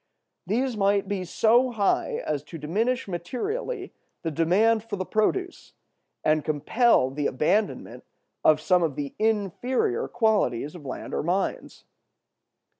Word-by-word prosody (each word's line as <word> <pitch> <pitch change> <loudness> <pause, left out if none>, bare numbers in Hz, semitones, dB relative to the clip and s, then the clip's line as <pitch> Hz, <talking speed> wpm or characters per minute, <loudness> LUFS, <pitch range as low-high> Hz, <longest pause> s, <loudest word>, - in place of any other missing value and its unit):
These 245 +3 0
might 200 -1 +2
be 200 -2 -2
so 235 +8 +3
high 210 -5 0
as 150 -2 -1
to 165 - -8
diminish 220 - -1
materially 375 - -4 0.3
the 165 - -2
demand 205 +8 +3
for 225 -2 -5
the 185 -1 -4
produce, 360 - -1 0.5
and 155 -1 +2
compel 155 - +2
the 145 +1 -1
abandonment 200 +11 -1 0.4
of 155 -1 +5
some 180 +3 +3
of 160 -5 0
the 140 -1 -4
inferior 245 - 0
qualities 205 - +1
of 160 -6 -10
land - - -6
or - - 0
mines. 180 +5 -2
200 Hz, 130 wpm, -26 LUFS, 160-235 Hz, 0.5 s, of